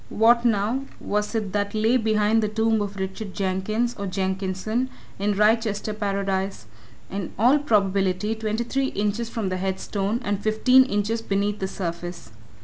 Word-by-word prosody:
What, 235 +2 +4
now, 230 +4 +1
was 210 +2 -2
it 210 -4 -1
that 205 0 -1
lay 220 +3 +3
behind 220 -1 +3
the 215 - +1
tomb 220 +1 +1
of 205 -1 -3
Richard 190 +1 -5
Jenkins, 205 +5 0
or 200 - -3
Jenkinson, 190 +5 -1 0.3
in 205 +1 +1
Wrychester 215 0 +2
Paradise? 195 - -2 0.5
in 195 -3 -4
all 250 +7 +5
probability 200 -5 +1
twenty 220 +1 -2
three 270 +3 0
inches 210 +1 -1
from 220 -5 -2
the 185 - -2
head 190 0 -2
stone, 205 +3 -1
and 205 -2 -1
fifteen 250 +5 +5
inches 210 0 -1
beneath 205 0 -1
the 190 - -1
surface. 175 - -5
210 Hz, 155 wpm, -24 LUFS, 195-225 Hz, 0.5 s, all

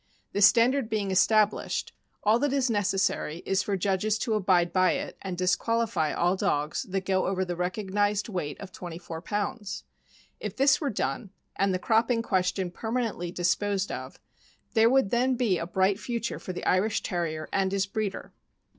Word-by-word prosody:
The 200 - -1
standard 235 +4 +5
being 205 -3 -1
established, 210 +2 +2 0.3
all 215 +3 +4
that 290 +1 +1
is 265 -3 +1
necessary 195 -5 0
is 195 0 +1
for 200 0 -1
judges 200 +3 0
to 225 0 -1
abide 180 -4 +2
by 185 -1 +4
it, 285 0 -4
and 185 -2 -5
disqualify 190 -1 +1
all 175 +2 +1
dogs 150 -6 -1
that 190 0 -2
go 190 -1 +1
over 190 0 0
the 175 -1 -3
recognized 205 +3 -1
weight 180 -9 -4
of 195 -2 -9
twenty 175 -1 -7
four 165 -2 -7
pounds. 205 +2 -3 0.6
If - - -5
this 275 +2 +4
were 290 - 0
done, 190 - -2 0.3
and 195 0 +1
the 185 - +1
cropping 230 +3 +2
question 185 -2 0
permanently 220 -5 -3
disposed 195 +3 0
of, - - -7 0.5
there 225 0 +5
would 265 -5 +3
then 250 +2 +2
be 225 -8 +1
a 170 - -4
bright 190 +2 +1
future 235 0 -3
for - - -6
the 180 - -6
Irish 200 +4 +2
Terrier 160 -3 -2
and 190 -1 +1
his 200 0 +1
breeder. 205 0 -4
195 Hz, 175 wpm, -27 LUFS, 185-220 Hz, 0.6 s, standard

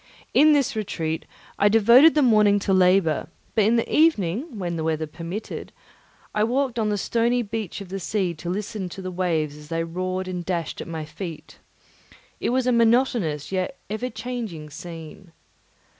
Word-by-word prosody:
In 305 +1 +6
this 280 -5 +1
retreat 165 -7 -3 0.3
I 205 - +5
devoted 235 +9 +7
the 300 - +4
morning 210 -4 +5
to 195 - +1
labour; 180 -3 +3 0.3
but 215 -3 +3
in 225 +3 +4
the 230 - +1
evening, 260 - +2
when 175 -3 -3
the 160 - -3
weather 160 0 -1
permitted, 170 +7 -6 0.6
I 210 - +2
walked 250 +1 0
on 215 -1 +1
the 205 - 0
stony 235 +4 +1
beach 210 -2 -5
of 195 - -9
the 195 +1 -4
sea 190 -2 -1
to 170 +2 -7
listen 200 0 -3
to 190 - -8
the 185 - -4
waves 165 -5 -1
as 150 0 -12
they 165 +1 -1
roared 185 +2 -3
and 180 -1 -4
dashed 170 -2 -3
at - - -7
my 160 -2 -5
feet. 160 0 -8 0.8
It - - -1
was 255 +1 +1
a 250 - +3
monotonous 230 - +2
yet 190 +8 -2
ever 240 +4 -2
changing 220 -11 -6
scene. 165 +2 -10
195 Hz, 175 wpm, -24 LUFS, 170-230 Hz, 0.8 s, devoted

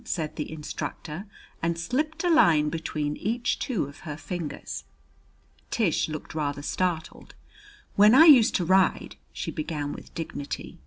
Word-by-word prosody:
said 155 -3 -3
the 150 - -4
instructor, 155 +3 -6 0.3
and 165 0 0
slipped 280 - -2
a 355 - +2
line 160 - +5
between 150 -2 -3
each 230 +4 -1
two 240 -9 -1
of 140 +2 -12
her 150 -3 -7
fingers. 160 +1 -5 0.9
Tish 190 -8 +1
looked 155 -1 -6
rather 145 -2 -2
startled. 175 0 -3 0.6
"When 210 +4 +7
I 320 +4 +9
used 265 -9 +7
to 180 - +1
ride 190 +2 +2
" - - -38
she - - -4
began 150 -3 -3
with - - -11
dignity. 155 -4 -6
165 Hz, 150 wpm, -26 LUFS, 150-210 Hz, 0.9 s, I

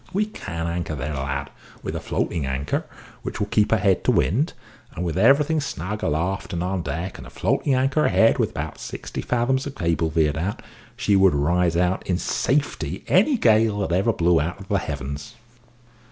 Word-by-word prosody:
"We 205 +3 +2
can 85 - -5
anchor 85 -2 -2
there, 75 +2 -4
lad, 70 0 -3 0.3
with - - -4
a - - -2
floating 85 -4 -2
anchor, 65 +2 -2 0.3
which - - -5
will 105 - +1
keep 105 0 +2
her 110 - +4
head 95 -3 +2
to - - +5
wind; 135 - +1 0.4
and 90 - -3
with 80 -2 -2
everything 145 - +4
snug 105 - -4
aloft 90 +7 -1
and 85 0 -1
on 95 0 -1
deck, 85 +5 -4
and - - -9
a - - -11
floating 140 - 0
anchor 135 +4 +2
ahead 115 - +4
with - - +2
about - - -5
sixty - - -6
fathoms 130 +3 0
of 140 - -7
cable 85 -1 0
veered 80 -1 +1
out, 95 +5 -3 0.3
she 100 - +2
would 95 -5 +5
ride 85 +3 +2
out 90 +1 +1
in 90 - +1
safety 100 - -1
any 220 +10 +4
gale 110 - +4
that 95 - -1
ever 100 +5 +3
blew 85 -5 +3
out 85 +6 -3
of 100 - -12
the 100 - +2
heavens." 70 - -5
90 Hz, 195 wpm, -23 LUFS, 80-115 Hz, 0.4 s, to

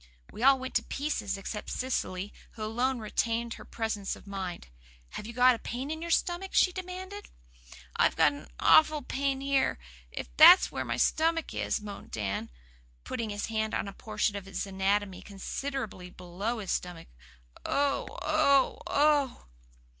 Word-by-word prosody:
We - - -9
all 270 +2 +6
went 260 0 -6
to - - -2
pieces, 270 -9 -2
except 210 +2 -6
Cecily, 205 -6 -2 0.2
who 220 - -7
alone 245 +4 0
retained 230 +1 -1
her - - -11
presence 220 -3 -3
of - - -15
mind. 190 - -5 0.4
"Have 210 - -7
you 235 - -7
got 250 +1 +6
a 230 - -5
pain 260 +5 -5
in 315 0 -4
your 340 - -5
stomach?" 350 +3 0
she 365 - +5
demanded. 370 +2 -7 0.7
"I've - - +3
got - - +5
an - - -10
awful 310 -2 +5
pain 270 +1 -1
here, 275 -1 +1 0.3
if - - -7
that's - - +9
where 130 - -3
my 120 -1 -3
stomach 325 - +1
is," - - -1
moaned 205 -1 -9
Dan, 100 -2 -3 0.5
putting 225 - -4
his 205 0 -3
hand 220 -1 -1
on - - -2
a 200 - -7
portion 210 0 -1
of 200 -2 -5
his 195 0 -3
anatomy 195 0 0
considerably 205 -1 -5
below 185 +7 -4
his 200 -4 -4
stomach. 175 -2 -4 0.5
"Oh 280 0 0 0.2
oh 290 -3 +3
oh!" 290 -3 +2
230 Hz, 160 wpm, -29 LUFS, 200-280 Hz, 0.7 s, that's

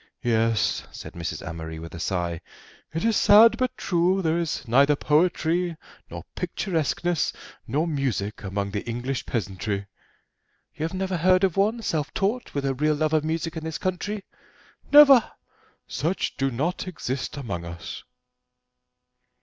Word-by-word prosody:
"Yes," 115 -1 +1
said - - -9
Mrs. 85 0 -5
Amory 80 -1 -6
with 80 +1 -9
a 85 - -7
sigh; 85 -1 -2 0.5
"it 165 +6 -2
is 230 -1 +3
sad, 220 +3 +7
but 255 -1 -1
true: 180 +2 +1
there 165 +1 +1
is 165 -5 -3
neither 140 +5 +5
poetry, 165 +2 +1 0.3
nor - - -7
picturesqueness, 175 -2 -1 0.4
nor 145 +8 0
music 130 - -2
among 100 0 -3
the 100 0 -3
English 125 +3 -3
peasantry." 100 -2 -3 0.9
"You 155 - -3
have 165 - -4
never 190 -1 -1
heard 185 +3 +4
of 185 -4 +2
one, 220 +4 +1
self 155 -6 -1
taught, 215 +2 -1
with 140 -1 -1
a 135 - +1
real 150 +3 +1
love 155 +1 0
of 155 -1 +3
music 165 +1 -2
in 160 - -5
this 160 -1 -4
country?" 195 +3 -3 0.7
"Never: 280 -5 +9 0.6
such 175 +5 -2
do 135 0 0
not 155 +10 -2
exist 140 -5 -4
among 100 -11 -4
us." 85 0 -7
155 Hz, 150 wpm, -25 LUFS, 115-180 Hz, 0.9 s, Never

